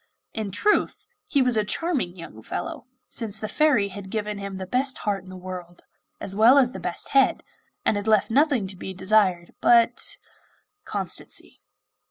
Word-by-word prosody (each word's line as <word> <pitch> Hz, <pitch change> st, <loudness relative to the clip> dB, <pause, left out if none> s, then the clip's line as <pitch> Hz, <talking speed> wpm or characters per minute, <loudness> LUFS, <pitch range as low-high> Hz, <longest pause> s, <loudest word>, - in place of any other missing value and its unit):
In 215 Hz, -2 st, -3 dB
truth, 415 Hz, -, +1 dB, 0.2 s
he 280 Hz, -4 st, +3 dB
was 250 Hz, -2 st, +1 dB
a 215 Hz, -, +2 dB
charming 225 Hz, -, -1 dB
young 165 Hz, -10 st, -10 dB
fellow, 235 Hz, -, -5 dB, 0.2 s
since 215 Hz, -3 st, -3 dB
the 215 Hz, -, -3 dB
Fairy 260 Hz, -8 st, +2 dB
had 195 Hz, 0 st, -9 dB
given 210 Hz, 0 st, -3 dB
him 200 Hz, -1 st, -6 dB
the 190 Hz, 0 st, -5 dB
best 255 Hz, +6 st, -1 dB
heart 200 Hz, -3 st, -2 dB
in 185 Hz, -, -14 dB
the 185 Hz, -, -9 dB
world 180 Hz, -1 st, -8 dB, 0.4 s
as 195 Hz, -11 st, -3 dB
well 230 Hz, +6 st, +7 dB
as 255 Hz, -3 st, +4 dB
the -, -, -7 dB
best 175 Hz, -, -4 dB
head, 270 Hz, -1 st, +3 dB, 0.4 s
and 205 Hz, -, +2 dB
had 205 Hz, +1 st, -4 dB
left 215 Hz, 0 st, +3 dB
nothing 275 Hz, -4 st, +3 dB
to 190 Hz, 0 st, -6 dB
be 190 Hz, +1 st, -7 dB
desired 185 Hz, -2 st, +2 dB
but 235 Hz, -, +3 dB, 0.7 s
constancy. -, -, -3 dB
210 Hz, 175 wpm, -25 LUFS, 190-250 Hz, 0.7 s, well